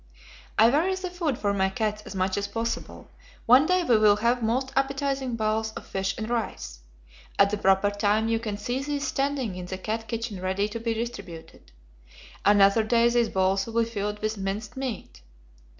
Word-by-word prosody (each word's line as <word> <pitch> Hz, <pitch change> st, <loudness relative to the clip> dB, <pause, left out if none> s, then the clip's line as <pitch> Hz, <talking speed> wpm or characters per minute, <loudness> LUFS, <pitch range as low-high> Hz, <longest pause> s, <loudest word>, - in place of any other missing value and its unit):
"I 225 Hz, +2 st, +6 dB
vary 340 Hz, +7 st, +2 dB
the 370 Hz, -1 st, -5 dB
food 330 Hz, -8 st, -2 dB
for 205 Hz, -1 st, 0 dB
my 190 Hz, -1 st, +1 dB
cats 210 Hz, 0 st, -2 dB
as -, -, -8 dB
much 185 Hz, 0 st, 0 dB
as 200 Hz, 0 st, -2 dB
possible. 230 Hz, +2 st, -5 dB, 0.3 s
One 255 Hz, +6 st, +6 dB
day 365 Hz, 0 st, +2 dB
we 235 Hz, -9 st, +3 dB
will 210 Hz, -1 st, +6 dB
have 235 Hz, +3 st, +1 dB
most 255 Hz, +4 st, -1 dB
appetizing 270 Hz, -2 st, -1 dB
bowls 220 Hz, 0 st, -1 dB
of -, -, -8 dB
fish 195 Hz, 0 st, -2 dB
and 220 Hz, -, -4 dB
rice. 200 Hz, -, -3 dB, 0.6 s
At 200 Hz, 0 st, +5 dB
the 210 Hz, -, -1 dB
proper 195 Hz, +1 st, +3 dB
time 205 Hz, +2 st, +1 dB
you 225 Hz, 0 st, +1 dB
can 215 Hz, -3 st, -4 dB
see 245 Hz, +6 st, -3 dB
these 285 Hz, 0 st, -2 dB
standing 270 Hz, -6 st, -1 dB
in 180 Hz, -1 st, -7 dB
the 190 Hz, -, -5 dB
cat 220 Hz, +3 st, -4 dB
kitchen 230 Hz, -5 st, -4 dB
ready 190 Hz, +2 st, 0 dB
to 230 Hz, +2 st, -5 dB
be 230 Hz, 0 st, -2 dB
distributed. 180 Hz, -, -7 dB, 0.7 s
Another 200 Hz, +1 st, +5 dB
day 235 Hz, +1 st, +3 dB
these 235 Hz, -1 st, +2 dB
bowls 190 Hz, +1 st, +1 dB
will 230 Hz, 0 st, +1 dB
be -, -, -4 dB
filled 210 Hz, -1 st, -4 dB
with 215 Hz, -1 st, -2 dB
minced 200 Hz, +2 st, -4 dB
meat. 240 Hz, -, -6 dB
220 Hz, 190 wpm, -26 LUFS, 200-240 Hz, 0.7 s, I